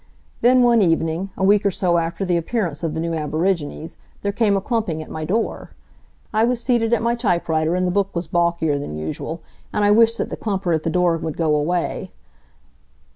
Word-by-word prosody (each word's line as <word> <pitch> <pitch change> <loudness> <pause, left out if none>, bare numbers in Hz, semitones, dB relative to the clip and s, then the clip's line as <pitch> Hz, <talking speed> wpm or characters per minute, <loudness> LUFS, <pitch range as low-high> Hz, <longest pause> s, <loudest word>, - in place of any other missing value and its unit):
Then 250 +1 +5
one 235 -2 +5
evening, 165 +1 +1
a - - -2
week 205 +1 +4
or 200 - +3
so 180 -3 +1
after 170 +4 -3
the 180 -1 +1
appearance 170 -3 -2
of 160 -2 -2
the - - -2
new 165 0 -2
aborigines, 160 0 -2 0.3
there 200 - 0
came 205 -1 +2
a - - +1
clumping 210 -6 -2
at - - -13
my 155 0 -4
door. 215 +8 -2 0.6
I 215 +1 +3
was 240 +1 +1
seated 235 -2 +1
at 235 - +2
my 235 0 +2
typewriter 170 -7 0
and 185 0 +1
the 180 - 0
book 200 0 -1
was 170 +1 -2
balkier 170 -3 +1
than 75 - -6
usual, 115 - -5 0.3
and 210 - +1
I 205 - +4
wished 230 +2 +5
that - - -3
the - - -4
clumper 195 -5 -1
at 160 - +1
the 165 - -2
door 175 0 +2
would 160 -2 -5
go 160 -2 +1
away. 165 +4 -1
180 Hz, 210 wpm, -21 LUFS, 160-210 Hz, 0.6 s, Then